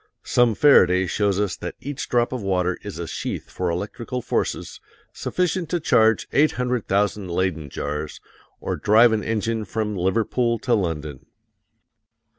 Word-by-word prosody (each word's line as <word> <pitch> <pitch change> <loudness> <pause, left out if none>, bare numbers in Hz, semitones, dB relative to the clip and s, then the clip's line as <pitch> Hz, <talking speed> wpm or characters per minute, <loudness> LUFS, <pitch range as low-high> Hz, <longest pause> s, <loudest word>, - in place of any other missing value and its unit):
Some 120 -3 +3
Faraday 95 -10 +5
shows 100 +1 0
us 105 -3 0
that - - -6
each 145 0 -6
drop 120 0 +2
of 125 - -3
water 90 -2 0
is 100 -4 -7
a 85 - -4
sheath - - -5
for 90 -1 -2
electric 100 +7 -5 0.2
forces - - -2 0.3
sufficient 180 -2 -1
to 175 - 0
charge 110 -7 +3
800,000 115 -8 +1
Leyden 85 -4 -1
jars, 75 +3 -5 0.4
or - - -3
drive 110 +3 +5
an 110 -2 0
engine 115 0 -1
from 105 0 -3
Liverpool 115 +6 0
to 120 +2 -1
London. 80 - -2
105 Hz, 140 wpm, -23 LUFS, 90-120 Hz, 0.4 s, Faraday